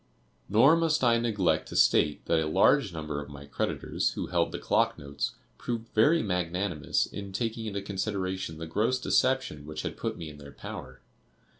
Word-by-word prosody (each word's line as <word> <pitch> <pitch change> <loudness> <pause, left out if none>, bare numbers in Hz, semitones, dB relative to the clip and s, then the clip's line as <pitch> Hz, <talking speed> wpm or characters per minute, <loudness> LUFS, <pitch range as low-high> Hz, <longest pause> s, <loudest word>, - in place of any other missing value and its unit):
Nor 120 +10 +6
must 160 -3 +1
I 115 -1 +4
neglect 110 -6 +1
to - - -7
state 75 - +3
that 85 - +2
a 80 - 0
large 80 - +4
number 75 -3 -4
of 70 - -9
my 70 0 -10
creditors 70 - -1
who - - -3
held - - 0
the - - -4
clock - - +1
notes, 70 0 -4 0.3
proved 115 -1 -4
very 150 +10 +4
magnanimous 90 -3 0
in 100 -1 -7
taking 115 +2 -2
into 100 -1 -3
consideration 95 -4 -3
the 80 - -5
gross 110 +10 +1
deception 130 - +1
which 75 0 -5
had - - -4
put - - -3
me 80 - -6
in 75 -1 -10
their 70 -1 -11
power. 65 0 -9
95 Hz, 180 wpm, -28 LUFS, 75-115 Hz, 0.3 s, Nor